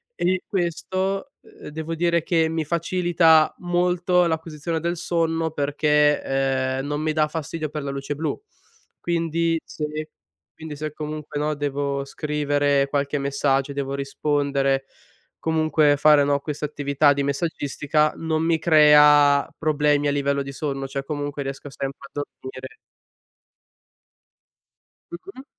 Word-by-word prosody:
e 185 +1 0
questo, 190 +2 -2
ehm, - - -13
devo 160 +2 -5
dire 170 0 +1
che 165 -2 +1
mi 160 -1 -2
facilita 170 -1 +3
molto 180 0 +1
l'acquisizione 160 0 -3
del 170 +1 -2
sonno 165 -1 -1
perché, 150 0 +2 0.6
ehm, 135 - -4
non 145 +1 -2
mi 155 0 0
dà 155 -1 +1
fastidio 155 0 -4
per 150 0 -5
la 140 - -3
luce 140 +1 -4
blu. 155 +1 -3 0.6
Quindi 165 -1 0
se 150 - -5 0.7
quindi 160 -2 -8
se 150 +1 -5
comunque, 150 -1 -5
no, 150 0 -1
devo 140 -1 -2
scrivere 145 -1 0
qualche 140 +1 -1
messaggio, 140 0 0
devo 140 0 -3
rispondere, 140 -1 0 0.5
comunque 155 -2 +2
fare, 150 0 +5
no, 140 0 +2
questa 150 +1 -4
attività 145 0 +2
di 140 0 -1
messaggistica, 145 0 0
non 160 -1 -1
mi 165 -1 +2
crea 150 -3 +6
problemi 150 -2 +1
a - - +2
livello 140 0 0
di 140 - -7
sonno, 135 -1 -4
cioè 135 0 -4
comunque 145 0 -4
riesco 135 +1 -6
sempre 135 +2 -5
a - - -62
dormire. 130 -2 -8 2.4
Mh-mh. 345 -6 -10
150 Hz, 130 wpm, -23 LUFS, 140-160 Hz, 2.4 s, crea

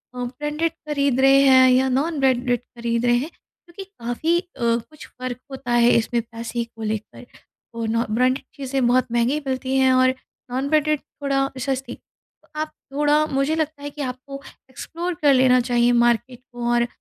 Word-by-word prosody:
अ, 250 - -4
branded 295 +6 -2
खरीद 285 -5 -1
रहे 270 0 +6
हैं 260 -1 +7
या 260 +1 +3
नॉन 290 +5 0
ब्रांडेड 250 -2 +2
खरीद 235 -1 -3
रहे 240 0 +4
हैं, 275 +6 -3
क्योंकि 345 +2 -14
काफ़ी 325 -1 -1
अ, - - -9 0.2
कुछ 235 +6 -2
फ़र्कब 255 -1 -7
होता 265 -2 -6
है 240 0 +5
इसमें 235 +1 0
पैसे 230 +1 -5
को 230 -1 -11
लेकर 215 +3 -5 0.5
और 230 -1 -3
नो 230 +2 0
ब्रांडेड 255 +4 +1
चीज़ें 270 -2 -1
बहुत 255 +1 +2
महँगी 240 +5 +1
मिलती 260 0 -2
हैं 265 -1 +4
और 255 0 +4 0.4
नॉन 265 +3 -2
ब्रांडेड 305 -1 +2
थोड़ा 275 -1 -2
सस्ती। 265 +1 -3
तो - - -35
आप 310 - -4 0.2
थोड़ा 295 +1 +3
मुझे 275 +2 0
लगता 310 -2 -3
है 290 - -4
कि 290 +1 -8
आपको 275 +1 -6 0.3
एक्सप्लोर 340 +6 -5
कर 285 -2 +5
लेना 255 -1 +5
चाहिए, 240 0 +2
मार्केट 240 +1 +1
को 240 -1 -3
और 240 0 +2
260 Hz, 175 wpm, -22 LUFS, 240-285 Hz, 0.5 s, हैं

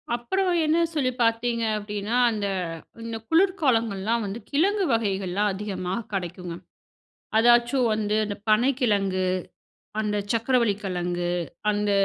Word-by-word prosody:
அப்புறம் 370 +11 -1 0.2
என்ன 310 +2 +3 0.2
சொல்லி 270 -5 +1
பார்த்தீங்க 230 0 +1
அப்பிடின்னா, 210 +2 -3
அந்த 210 -3 -2 0.6
இந்த 230 0 -4
குளிர்காலங்கள்லாம் 235 - +2
வந்து 200 +3 -5
கிழங்கு 385 +7 +2
வகைகள்லாம் 200 -2 0
அதிகமா 190 -2 -4 0.2
கிடைக்குங்க. 180 -2 -4 0.8
அதாச்சும் 240 +2 +4
வந்து 210 -1 0
அந்த 205 -1 -4
பனை 225 +5 +4
கிழங்கு, 195 -6 +1 0.8
அந்த 210 -1 0
சர்க்கரவள்ளி 230 -2 +2
கிழங்கு, 175 -1 -2 0.4
அந்த 205 0 0
220 Hz, 110 wpm, -25 LUFS, 200-240 Hz, 0.8 s, அதாச்சும்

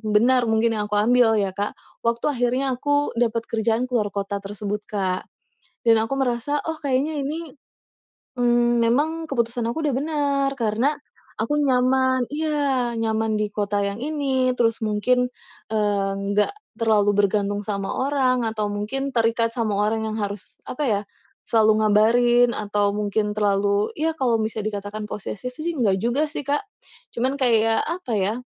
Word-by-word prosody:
benar 245 +2 +4
mungkin 225 +1 +2
yang 210 - -2
aku 210 - -2
ambil 225 +1 +4
ya, 200 -2 0
Kak. 205 +2 -3 0.3
Waktu 235 0 0
akhirnya 255 +1 0
aku 290 +1 +1
dapet 230 -1 +1
kerjaan 225 +1 +1
keluar 230 -4 +1
kota 200 0 -3
tersebut, 205 +1 -4
Kak, 190 -3 -2 0.6
dan 230 -1 +6
aku 225 +5 -2
merasa, 265 +2 0
"Oh, 320 - -1
kayaknya 285 +2 0
ini, 305 +1 -5 0.8
mmm, 240 0 +3
memang 315 +7 +1
keputusan 235 -2 -1
aku 315 +7 -3
udah 285 - +1
benar 280 -2 0
karena 230 +6 +1 0.5
aku 260 +7 0
nyaman," 260 -1 +2
iya, 285 -5 0
nyaman 220 0 0
di 210 -1 -1
kota 205 -1 -1
yang 200 0 -2
ini, 270 -4 0
terus 230 -1 +2
mungkin, 250 +4 +2 0.5
eee, 205 -2 +1 0.2
nggak 210 - +2 0.3
terlalu 215 -3 +3
bergantung 205 0 +1
sama 200 -2 -3
orang 260 -3 +1
atau 215 -1 -1
mungkin 240 +7 -2
terikat 230 0 +2
sama 220 -4 0
orang 220 +1 0
yang 215 - -4
harus 200 -1 -5 0.2
apa 295 - -3
ya, 205 -3 +1 0.5
selalu 220 -1 +5
ngabarin, 240 +3 +4
atau 205 -1 0
mungkin 210 0 -1
terlalu 200 0 +1
ya 320 +1 0
kalau 250 -6 +1
bisa 220 0 -2
dikatakan 210 0 -4
posesif 210 +4 -5
sih 335 +2 -2
enggak 205 -7 +2
juga 255 +7 +1
sih, 295 - -5
Kak. 290 +5 +1 0.5
Cuman 255 +3 0
kayak 225 -2 +3
apa 340 -5 -4
ya, 200 +2 +1
230 Hz, 155 wpm, -23 LUFS, 210-260 Hz, 0.8 s, dan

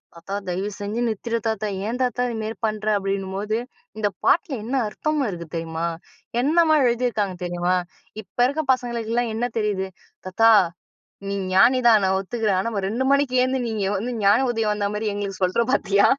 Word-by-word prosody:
"தாத்தா, 170 +4 -8 0.2
தயவு 195 +4 -2
செஞ்சு 210 +4 -2
நிறுத்திடு 230 +2 -2
தாத்தா! 215 -1 -1 0.2
ஏன் 245 +3 -3
தாத்தா 250 0 0
இதுமேரி 220 -1 -4
பண்ற?" 215 0 -4
அப்டின்னும்போது, 195 +2 -2 0.4
"இந்த 205 -1 +1 0.2
பாட்ல 335 -5 +3
என்ன 255 - -2
அர்த்தம் 305 +5 -1
இருக்கு 170 -2 -7
தெரியுமா? 165 0 -2 0.6
என்னம்மா 315 +1 +4
எழுதியிருக்காங்க 225 -6 0
தெரியுமா? 175 +1 0 0.5
இப்ப - - -46
இருக்க 300 +4 -2
பசங்களுக்கெல்லாம் 235 -2 -2
என்ன 240 +2 0
தெரியுது?" 195 -3 -1 0.4
"தாத்தா, 225 +5 +5 0.8
நீ 200 - -2 0.2
ஞானி 250 +7 +6
தான். 225 -3 +7
நான் 190 0 +2
ஒத்துக்கிறேன். 205 0 -1
ஆனா, 215 - -1
ஒரு 195 - -1
2 235 +5 -1
மணிக்கு 280 -2 +2
ஏழுந்து 255 +1 +1
நீங்க 220 -3 -2
வந்து 230 +6 -2
ஞான 215 +7 +5
உதயம் 225 -3 0
வந்த 205 -1 -2
மாரி 215 +1 -2
எங்களுக்கு 200 -1 -5
சொல்ற 185 +5 +2
பார்த்தியா?" 200 -6 +3
215 Hz, 165 wpm, -23 LUFS, 195-240 Hz, 0.8 s, தான்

